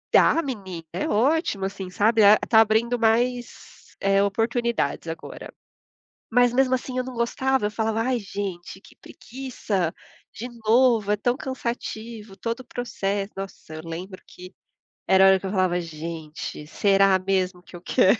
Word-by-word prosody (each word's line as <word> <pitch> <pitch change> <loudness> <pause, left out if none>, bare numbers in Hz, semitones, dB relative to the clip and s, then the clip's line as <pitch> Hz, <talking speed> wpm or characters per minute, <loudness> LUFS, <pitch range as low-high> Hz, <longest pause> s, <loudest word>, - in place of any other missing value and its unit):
Dá, 330 - +5
menina, 190 - -6
é 180 - -2
ótimo, 245 - +1
assim, 190 -1 -5
sabe. 215 +4 +3
Ah 205 +1 +8
tá 220 -1 +7
abrindo 225 +2 +2
mais, 240 +2 -1
eh, 195 0 +3
oportunidades 225 - 0
agora. 165 0 -7 0.8
Mas, 245 0 +4
mesmo 260 +1 +2
assim, 255 0 -7
eu 255 - +1
não 255 0 -7
gostava. 260 +1 0
Eu 210 - -3
falava: 220 0 0
"Ai, 250 0 0
gente, 190 -2 -6
que - - -18
preguiça. 225 -9 -4 0.4
De 240 - -6 0.2
novo? 225 -2 +4
É 210 - +3
tão 245 +5 0
cansativo 230 -5 -5
todo 230 +6 -3
o - - -10
processo". 205 -5 -3
Nossa, 195 -5 -8
eu 155 - -7
lembro 180 +3 -7
que 180 +1 -12 0.5
era 190 0 +5
a - - +8
hora 190 0 +5
que - - -7
eu 190 - -3
falava: 185 -3 +1
"Gente, 160 -2 -7
será 195 +2 +3
mesmo 185 -1 -1
que - - -14
eu 175 - -10
quero?". 185 +3 +4
210 Hz, 160 wpm, -24 LUFS, 190-240 Hz, 0.8 s, Ah